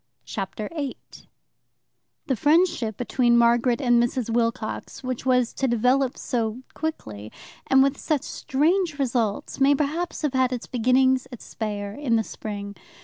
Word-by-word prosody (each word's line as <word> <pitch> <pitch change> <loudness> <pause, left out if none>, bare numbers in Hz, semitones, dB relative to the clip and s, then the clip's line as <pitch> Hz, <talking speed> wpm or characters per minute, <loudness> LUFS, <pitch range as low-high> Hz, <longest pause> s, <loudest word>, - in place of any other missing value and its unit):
Chapter 200 +1 -5
8 285 -4 -7 1.0
The 270 - 0
friendship 295 - +2
between 240 -1 +2
Margaret 235 +1 +3
and 240 -3 +4
Mrs. 240 -1 -1
Wilcox, 230 +1 -2
which 255 0 -4
was 250 -2 +2
to 270 - -1
develop 250 +2 +2
so 235 0 -2
quickly 110 - -5 0.4
and 265 0 +6
with 275 0 0
such 300 -4 -1
strange 325 +5 0
results, 240 -7 -1
may 275 +1 +5
perhaps 310 +4 -2
have 295 -3 0
had 260 -1 +2
its 245 -2 -4
beginnings 255 +2 +2
at 245 - -8
Speyer, 205 -2 -5
in 260 -2 0
the 225 - +2
spring. 205 -2 -7
250 Hz, 145 wpm, -24 LUFS, 230-275 Hz, 1.0 s, and